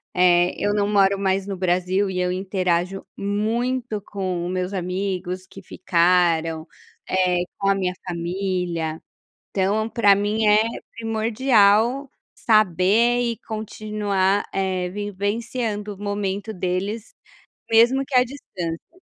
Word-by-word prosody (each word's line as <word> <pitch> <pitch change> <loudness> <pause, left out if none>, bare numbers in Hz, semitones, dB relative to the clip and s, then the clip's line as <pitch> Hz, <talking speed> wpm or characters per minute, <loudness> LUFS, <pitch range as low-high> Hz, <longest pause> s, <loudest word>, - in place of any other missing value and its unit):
eh, 180 0 +4
eu 205 - 0
não 205 -1 +1
moro 200 -1 +3
mais 190 0 0
no 195 -2 -4
Brasil 185 +2 +1
e 185 -1 -3
eu 180 0 0
interajo 185 0 -1
muito 220 +3 -1
com 185 -4 -3
o - - -3
meus 185 +1 -2
amigos 185 0 -3
que 195 - -12
ficaram, 170 -3 +1 0.9
com 195 -1 +1
a 195 - +4
minha 185 -2 -1
família, 175 -2 -2 0.5
então 205 +3 0
para 205 -4 +4
mim 210 +2 0
é 210 0 +6 0.4
primordial 225 +2 +2 0.3
saber 215 +3 +3
e 235 -2 -1
continuar, 210 -2 -1
eh, 185 -2 -1
vivenciando 205 +2 -3
o 195 - -15
momento 205 +1 -3
deles, 195 +4 -3 0.6
mesmo 240 +4 +5
que 270 - -7
a 250 - +7
distância. 185 - -7
195 Hz, 120 wpm, -22 LUFS, 180-215 Hz, 0.9 s, a